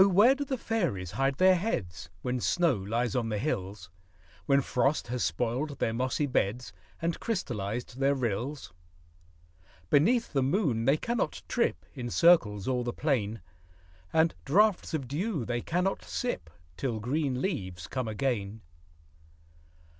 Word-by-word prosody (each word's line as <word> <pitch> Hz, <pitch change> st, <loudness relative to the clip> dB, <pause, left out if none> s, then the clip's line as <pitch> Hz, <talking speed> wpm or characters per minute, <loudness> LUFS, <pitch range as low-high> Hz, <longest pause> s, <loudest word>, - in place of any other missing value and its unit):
where 205 Hz, +8 st, +6 dB
do 280 Hz, +1 st, -3 dB
fairies 155 Hz, -, -1 dB
hide 135 Hz, 0 st, +1 dB
their 185 Hz, +6 st, +6 dB
heads, 90 Hz, -, -3 dB
When 125 Hz, 0 st, -1 dB
snow 170 Hz, +4 st, +2 dB
lies 115 Hz, +2 st, -1 dB
on 120 Hz, -3 st, 0 dB
the 105 Hz, -, -1 dB
hills, 95 Hz, -, -3 dB, 0.6 s
When 140 Hz, 0 st, +4 dB
frost 130 Hz, +1 st, 0 dB
has 125 Hz, 0 st, -1 dB
spoiled 125 Hz, -, -1 dB
their 115 Hz, -, 0 dB
mossy 130 Hz, +4 st, 0 dB
beds, 125 Hz, -2 st, -1 dB, 0.3 s
And 165 Hz, 0 st, -1 dB
crystallized 120 Hz, -, -3 dB
their 140 Hz, +1 st, +3 dB
rills? 125 Hz, +3 st, -3 dB, 1.2 s
Beneath 230 Hz, -, +3 dB
the 135 Hz, -, +2 dB
moon 135 Hz, -, +1 dB
they 135 Hz, +4 st, +4 dB
cannot 235 Hz, +7 st, -2 dB
trip 240 Hz, -, 0 dB
In 125 Hz, -4 st, -5 dB
circles 115 Hz, -, +4 dB
o'er 125 Hz, -1 st, +1 dB
the 120 Hz, -, -2 dB
plain; 115 Hz, -, -1 dB, 0.7 s
And 160 Hz, 0 st, +3 dB
draughts 190 Hz, +2 st, +3 dB
of 135 Hz, -5 st, -3 dB
dew 155 Hz, -, -2 dB
they 120 Hz, 0 st, -2 dB
cannot 180 Hz, +7 st, -1 dB
sip, 165 Hz, -, -3 dB, 0.3 s
Till 120 Hz, -5 st, -2 dB
green 130 Hz, +3 st, -1 dB
leaves 95 Hz, -, -3 dB
come 130 Hz, +4 st, -3 dB
again. 110 Hz, -2 st, -2 dB
130 Hz, 140 wpm, -29 LUFS, 115-160 Hz, 1.2 s, where